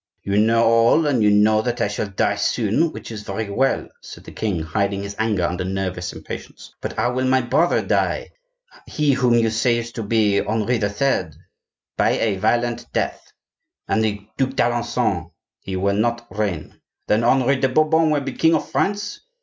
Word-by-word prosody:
"You 100 +1 +1
know 115 +2 +3
all, 115 +7 +4
and 135 -6 +1
you 105 - +5
know 105 +1 +4
that 120 +1 -3
I - - +1
shall 105 +1 -3
die 100 +1 0
soon, 110 +9 +1
which - - -9
is 110 -2 -6
very 100 +1 -4
well," 135 +6 +1
said - - -11
the - - -11
king, 95 -7 -2
hiding 100 +5 -1
his 100 0 -6
anger 110 -5 0
under 90 +1 -1
nervous 95 -1 -3
impatience; - - -9
"but - - -4
how 120 - 0
will 130 +1 0
my 130 0 +3
brother 140 +8 +1
die,—he - - -2
whom 125 -2 +2
you 115 -1 +2
say 115 +2 +2
is 115 0 -5
to 115 - -5
be 105 -2 +2
Henri 110 +3 0
III.?" 100 - 0 0.6
"By - - +2
a 105 -4 0
violent 120 +4 0
death." - - -3 0.6
"And 110 - +1
the 105 -2 -2
Duc 130 0 0
d'Alencon?" 120 -8 0 0.3
"He 95 - -6
will 100 +2 +1
not 120 +2 0
reign." 100 -8 -3 0.2
"Then 110 +2 +2
Henri 130 +3 +3
de 130 0 +1
Bourbon 155 +3 +3
will 150 -2 +1
be 135 -1 -4
king 165 +4 +3
of 155 - -2
France?" 205 +1 -1
115 Hz, 180 wpm, -21 LUFS, 100-130 Hz, 0.6 s, you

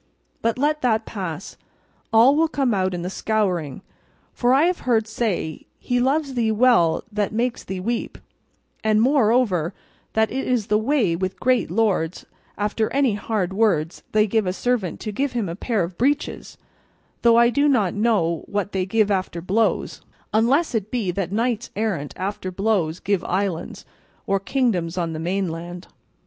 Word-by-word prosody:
But 230 +1 0
let 300 +3 +1
that 225 -3 +1
pass; 185 -3 -6 0.5
all 235 +5 +6
will 325 +2 +3
come 275 -6 0
out 185 -2 0
in 175 - -4
the 180 - -3
scouring; 185 -9 -1 0.5
for 245 0 +1
I 270 +3 +5
have 355 +1 +1
heard 225 -3 +1
say 210 -8 -3
'he 245 0 -1
loves 275 +2 +1
thee 230 -3 +1
well 215 -8 +3
that 205 -1 -1
makes 235 +2 -1
thee 190 0 -5
weep;' 230 +5 -3 0.7
and 215 -1 +3
moreover 225 - +2 0.4
that 220 0 +2
it 265 +2 -3
is 245 -5 +1
the 210 0 +2
way 220 - +1
with 185 +2 -3
great 255 -6 +2
lords 185 -4 0 0.3
after 210 +1 0
any 275 -4 +2
hard 205 -3 -2
words 180 -6 +1
they 215 0 +4
give 220 -1 0
a 180 - 0
servant 225 -5 -1
to 215 - -4
give 265 +5 -1
him 230 -5 -1
a 165 - -4
pair 215 0 -1
of 170 +1 -7
breeches; 285 +4 -1 0.6
though 235 -1 +5
I 235 0 +5
do 285 +3 +2
not 220 -10 +2
know 205 -7 +1
what 205 -1 -2
they 190 -1 -1
give 215 +1 +2
after 185 -3 -1
blows, 200 +6 0 0.3
unless 255 +10 +2
it 215 -3 -1
be 220 -7 -1
that 185 0 -3
knights 230 +2 -1
errant 190 -9 -2
after 190 0 -3
blows 185 -4 0
give 200 -2 0
islands, 185 -3 -2 0.4
or 195 0 +1
kingdoms 190 -7 0
on 170 -2 -1
the 155 - -5
mainland." 175 0 -3
215 Hz, 170 wpm, -22 LUFS, 185-240 Hz, 0.7 s, all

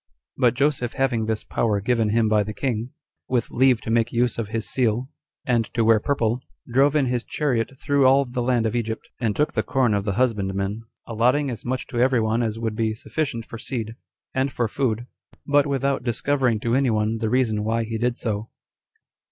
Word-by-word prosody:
But 125 -2 +3
Joseph 135 -3 0
having 120 -5 0
this 110 -1 -1
power 105 -3 0
given 115 +1 +1
him 110 +1 +2
by 105 -1 +3
the 105 +1 -4
king, 120 -1 -2 0.4
with 120 -3 0
leave 130 -1 +3
to 115 - -4
make 115 +1 +2
use 120 0 +1
of 115 - -2
his 110 0 -3
seal, 125 +2 0 0.3
and 120 -3 +2
to 115 -2 +2
wear 115 -1 +5
purple, 120 -1 0 0.3
drove 135 +4 +3
in 145 -3 +3
his 125 -1 -1
chariot 135 -5 -1
through 140 -3 +3
all 135 +1 +5
the 125 0 -3
land 120 -2 +1
of 110 - -1
Egypt, 110 -1 -3
and 110 -4 0
took 150 - +1
the - - +1
corn 130 -5 +1
of 100 -1 0
the 100 -1 -1
husbandmen, 100 -2 -1 0.2
3 115 - -7
allotting 125 +5 +2
as 115 - -7
much 130 +1 -2
to 120 - -4
every 125 0 +3
one 110 +1 +1
as 110 -2 -1
would 115 -1 -2
be 110 -1 0
sufficient 120 -2 -3
for 115 - -9
seed, 115 -3 -4 0.4
and 130 +1 0
for 120 -3 0
food, 120 0 -1 0.4
but 145 0 +3
without 140 -1 0
discovering 125 -1 +1
to 115 0 0
any 135 0 +3
one 110 0 0
the 110 -1 -1
reason 110 -4 +1
why 115 +1 0
he 110 0 -4
did 120 +1 0
so. 110 -1 -3
120 Hz, 210 wpm, -23 LUFS, 110-130 Hz, 0.4 s, wear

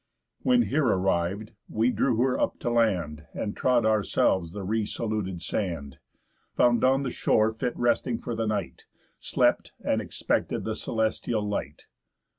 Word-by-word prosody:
When 250 -1 +4
here 150 - +1
arriv'd, 95 +1 0 0.2
we 115 +3 +2
drew 125 -2 +1
her 130 -1 +1
up - - 0
to 120 - -1
land, 90 -10 0
And 105 - -3
trod 125 -3 +2
ourselves 100 -5 +2
the 100 +1 -6
re 110 +3 0
saluted 105 -5 -3
sand, 85 -8 -3 0.6
Found 120 -1 +4
on 135 +1 +4
the 130 - -2
shore 110 +1 +2
fit 120 +2 -3
resting 120 0 +1
for 120 - -5
the 115 0 -1
night, 105 -4 -3 0.3
Slept, - - +1
and - - +1
expected - - -1
the - - -2
celestial 110 -1 -1
light. 75 -8 -4
110 Hz, 150 wpm, -27 LUFS, 95-120 Hz, 0.6 s, When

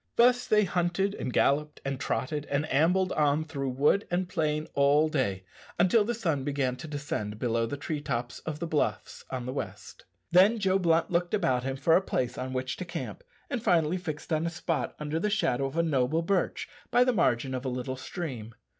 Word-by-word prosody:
Thus 245 +1 +4
they 210 0 +4
hunted 180 +2 0
and 130 - -4
galloped, 150 +4 +1
and 135 -1 -2
trotted 145 +2 -2
and 145 +2 0
ambled 180 +6 +3
on 150 0 +2
through 140 -4 -3
wood 145 +10 +2
and 180 +1 0
plain 155 -3 -1
all 145 +3 +4
day, 100 -11 -1 0.3
until 185 +5 +4
the 240 +3 -2
sun 165 - -1
began 135 -3 -1
to 155 - -8
descend 145 -8 -4
below 115 0 0
the 145 - -4
tree 150 +1 -4
tops 120 -3 -3
of 155 -2 -5
the 170 - -3
bluffs 160 -3 -2
on 130 -2 -4
the 130 - -4
west. 105 -7 -7 0.3
Then 190 +6 +6
Joe 195 -2 +2
Blunt 165 -2 +2
looked 175 +3 +1
about 130 -11 +1
him 135 0 -2
for 160 +4 +4
a - - +5
place 125 -9 -2
on 130 +1 -4
which 130 0 -3
to - - -4
camp, 180 - -6 0.2
and 250 -5 -3
finally 170 -3 +2
fixed 155 -1 -5
on 160 +2 +1
a - - 0
spot 170 0 -2
under 150 +1 -2
the 210 - 0
shadow 135 - +1
of 135 - -7
a 170 - +3
noble 155 +1 +1
birch 190 +2 0 0.2
by 245 - +5
the 250 0 +2
margin 130 - +1
of 130 0 -3
a 130 - -2
little 125 +1 -3
stream. 130 - -6
150 Hz, 205 wpm, -28 LUFS, 130-175 Hz, 0.3 s, Then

